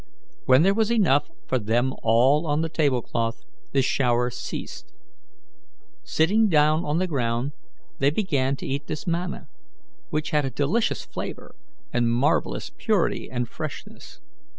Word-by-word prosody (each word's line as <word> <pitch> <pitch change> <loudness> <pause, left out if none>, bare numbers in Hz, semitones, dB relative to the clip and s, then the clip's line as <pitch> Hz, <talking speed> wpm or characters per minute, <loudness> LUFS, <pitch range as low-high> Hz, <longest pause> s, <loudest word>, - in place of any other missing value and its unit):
When 130 +4 +6
there 195 +2 +4
was 220 +1 +1
enough 175 - +3 0.2
for 130 - 0
them 120 +4 +1
all 130 +8 +3
on 150 +1 +1
the 165 - -1
table 140 -7 +1
cloth 115 -1 -3 0.3
the 135 -1 +2
shower 125 -2 +1
ceased. - - -7 1.1
Sitting 210 +7 +2
down 155 0 +3
on 150 0 -1
the 185 - +1
ground, 125 -4 -1 0.5
they 140 - +4
began 145 -7 0
to - - -8
eat 140 +2 -3
this 155 +3 -5
manna, 175 -1 -3 0.6
which 155 0 -2
had 150 -1 +2
a 135 - -1
delicious 145 - 0
flavour - - -7 0.4
and 120 -1 +2
marvellous 120 - 0
purity - - 0
and 125 -1 -2
freshness. - - -8
140 Hz, 145 wpm, -25 LUFS, 125-160 Hz, 1.1 s, When